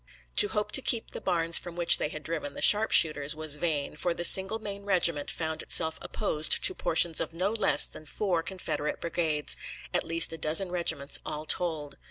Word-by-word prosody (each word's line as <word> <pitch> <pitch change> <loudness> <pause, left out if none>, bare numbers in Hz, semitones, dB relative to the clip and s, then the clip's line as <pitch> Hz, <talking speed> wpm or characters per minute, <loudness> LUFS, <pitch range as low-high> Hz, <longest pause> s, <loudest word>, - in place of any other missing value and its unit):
To - - +6
hope 210 0 -4
to 270 - +6
keep 230 -3 -2
the - - -8
barns 170 -2 +2
from 175 -1 -11
which 175 -1 +3
they - - -3
had 155 0 -9
driven 155 -3 -6
the - - -8
sharpshooters 155 -8 +4
was 155 -1 +1
vain, 150 -3 -3
for 170 +2 -3
the 175 - -1
single 190 +5 +5
Maine 200 -2 -9
regiment 175 -7 0
found 160 -1 -5
itself 160 -1 0
opposed 155 -7 +1
to - - +4
portions 165 0 +2
of 165 - -6
no 185 +4 -2
less 220 -3 +2
than 155 - -11
four 180 0 -3
Confederate 175 -4 -6
brigades, 160 -3 -1 0.4
at - - -1
least 165 0 +1
a 165 - -9
dozen 165 +5 0
regiments 170 -5 -2
all 150 +1 -6
told. 155 -5 -2
165 Hz, 195 wpm, -26 LUFS, 155-190 Hz, 0.4 s, To